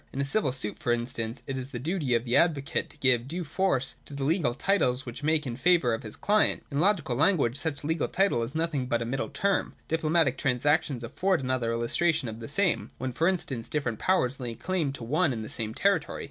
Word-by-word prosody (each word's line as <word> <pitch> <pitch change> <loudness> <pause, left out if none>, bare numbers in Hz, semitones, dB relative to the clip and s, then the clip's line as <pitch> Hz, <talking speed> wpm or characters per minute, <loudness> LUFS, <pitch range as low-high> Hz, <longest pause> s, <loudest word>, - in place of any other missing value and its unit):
In 135 - -6
a - - +2
civil 140 0 +1
suit, 125 -5 -4
for 120 - 0
instance, 120 0 -2
it 135 - -4
is 130 +1 -6
the 130 - -5
duty 145 -2 0
of 115 +1 0
the 120 - +1
advocate 150 -5 +1
to - - -13
give 130 -3 +3
due 175 +5 -4
force 145 -6 0
to 145 - -9
the 140 - -3
legal 145 -5 +1
titles 135 -7 +1
which 120 +2 -7
make 155 0 +1
in 120 -3 -3
favour 150 -3 +3
of 115 - -2
his 110 -1 -8
client. 210 +1 +2
In 140 - -1
logical 170 -8 +2
language, 145 -5 +3
such 145 0 -2
a - - -6
legal 160 0 0
title 190 -10 +1
is 115 +5 -4
nothing 160 -5 -1
but 115 -2 0
a - - -5
middle 130 +4 -2
term. 195 +8 0
Diplomatic 160 -4 +1
transactions 140 0 +1
afford 180 +6 0
another 130 -3 0
illustration 140 +6 +1
of 110 0 -6
the 115 - -8
same, 180 +4 +2
when, 130 0 -3
for 160 +7 +1
instance, 135 -11 -2
different 125 -7 -2
powers 140 -8 +1
lay 120 -3 -4
claim 165 0 -1
to 130 - -8
one 150 +6 +1
and 110 -3 -4
the - - -8
same 110 -2 -3
territory. 195 -5 +1
140 Hz, 230 wpm, -28 LUFS, 120-165 Hz, -, give